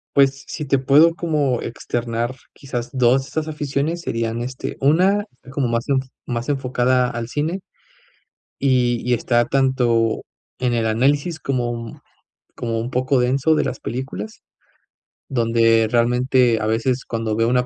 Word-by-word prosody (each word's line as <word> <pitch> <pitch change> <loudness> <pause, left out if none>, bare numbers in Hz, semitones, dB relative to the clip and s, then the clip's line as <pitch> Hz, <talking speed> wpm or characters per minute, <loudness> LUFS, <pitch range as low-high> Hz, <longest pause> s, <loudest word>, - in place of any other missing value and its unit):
Pues, 135 -2 +3
si 150 - -5
te 135 -1 +2
puedo 150 +6 +5
como 145 -7 0
externar, 120 +1 -3 0.2
quizás 125 -4 -5
2 130 +1 +3
de - - -11
estas 155 +3 -3
aficiones, 150 +2 -2
serían, 115 -2 -2
este, 130 +1 -5
una 185 +9 +3 0.3
como 135 -1 -1
más 115 +3 -1
enf 135 -1 +1 0.2
más 120 +1 -4
enfocada 125 -2 +1
al 120 -1 -4
cine. 155 +9 -2 1.0
Y 125 -3 +2
y 125 - +4
está, 120 0 +2
tanto 120 -4 +1 0.4
en 125 -2 0
el 115 -1 +1
análisis, 140 +8 +1
como 125 -3 -1
un 115 -1 -7 0.5
como 115 -2 -2
un 120 +3 -4
poco 130 +1 +1
denso 135 +5 +2
de - - +1
las 130 - -4
películas, 110 -4 -5 0.9
donde 115 -2 +3
realmente 125 0 +3
a - - -1
veces, 120 +3 0
cuando 115 -2 -2
veo 115 +1 +2
una 125 0 +2
125 Hz, 150 wpm, -21 LUFS, 115-135 Hz, 1.0 s, puedo